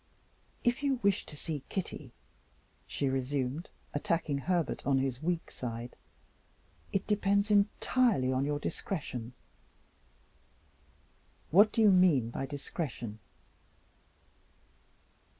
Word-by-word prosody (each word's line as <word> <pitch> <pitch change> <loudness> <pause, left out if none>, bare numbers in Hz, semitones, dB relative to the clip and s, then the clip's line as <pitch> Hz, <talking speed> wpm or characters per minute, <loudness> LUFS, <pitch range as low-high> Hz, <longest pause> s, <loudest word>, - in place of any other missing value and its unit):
"If 240 +2 +2
you 280 -2 +2
wish 200 -1 +2
to 150 - -8
see 150 -1 -4
Kitty," 150 -8 -4 0.8
she 140 - -1
resumed, 135 +3 -1 0.2
attacking 150 -1 0
Herbert 175 +2 0
on 140 -1 +2
his 130 -1 -1
weak 170 +1 -1
side, 120 0 -5 1.0
"it 195 - 0
depends 200 0 +2
entirely 205 - +3
on 130 +1 +1
your 145 +1 0
discretion." 140 - -4 2.2
"What 205 +6 +7
do 225 - +1
you 210 - +7
mean 165 -11 +4
by 135 - -3
discretion?" 135 -6 -5
150 Hz, 100 wpm, -31 LUFS, 130-195 Hz, 2.2 s, What